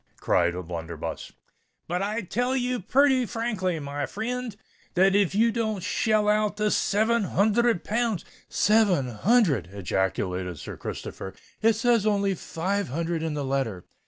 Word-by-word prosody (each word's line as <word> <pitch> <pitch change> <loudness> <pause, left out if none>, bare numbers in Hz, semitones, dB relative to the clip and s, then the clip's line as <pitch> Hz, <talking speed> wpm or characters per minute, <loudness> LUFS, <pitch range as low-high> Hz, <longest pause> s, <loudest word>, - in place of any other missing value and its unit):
cried 85 - +2
O'Blunderbuss. 85 -2 -6 0.6
"But 180 +2 -1
I 210 +3 -1
tell 245 +7 -1
you 250 -1 0
purty 260 +4 +3
frankly, 205 -8 -2
my 145 0 -4
frind, 235 +1 -4 0.4
that 190 +2 +4
if 200 -2 +2
ye 230 +2 +4
don't 220 -5 -2
shell 215 +1 +1
out 210 0 +2
the 210 0 +1
seven 220 +2 +2
hunthred 220 +1 +2
pounds——" 225 -5 -1 0.2
"Seven 205 - +3
hundred!" 145 - +2
ejaculated 95 -2 -2
Sir - - -7
Christopher. 95 - -7 0.3
"It 225 0 +5
says 230 -1 +2
only 200 -2 +2
five 190 +3 -2
hundred 165 +4 -2
in 160 -2 -2
the 145 -2 -2
letter." 130 -9 -2
200 Hz, 140 wpm, -26 LUFS, 145-225 Hz, 0.6 s, It